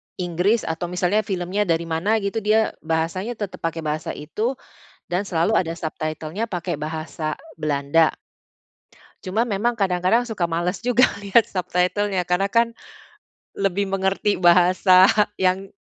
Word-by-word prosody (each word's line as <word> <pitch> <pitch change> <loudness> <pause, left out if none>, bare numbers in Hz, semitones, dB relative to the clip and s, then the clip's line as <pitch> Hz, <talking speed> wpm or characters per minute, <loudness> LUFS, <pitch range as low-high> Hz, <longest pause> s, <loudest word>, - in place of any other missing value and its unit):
Inggris, 180 +5 0
atau 165 +2 -3
misalnya 180 +4 0
filmnya 190 +2 -1
dari 165 -1 +1
mana 165 +6 0
gitu 200 +3 -1
dia 220 +1 +2
bahasanya 165 +8 -2
tetap 205 -4 -6
pakai 165 -1 -3
bahasa 155 +1 -3
itu 215 - -3 0.5
dan 180 +3 -1
selalu 185 +2 0
ada 165 -2 +1
subtitle-nya 160 +4 -4
pakai 175 -1 -2
bahasa 155 +1 -4 0.2
Belanda. 155 +1 +2 1.1
Cuma 210 +5 0
memang 230 +2 -1
kadang-kadang 190 +5 +2
suka 190 -7 -2
males 175 +5 -2
juga 245 +1 +4 0.2
lihat 205 +3 +4
subtitle-nya 185 +1 -1
karena 180 +3 +1
kan 230 +1 +2 0.8
lebih 195 0 0
mengerti 195 +1 0
bahasa 185 +1 +5 0.3
yang 190 +1 0
185 Hz, 130 wpm, -22 LUFS, 165-205 Hz, 1.1 s, bahasa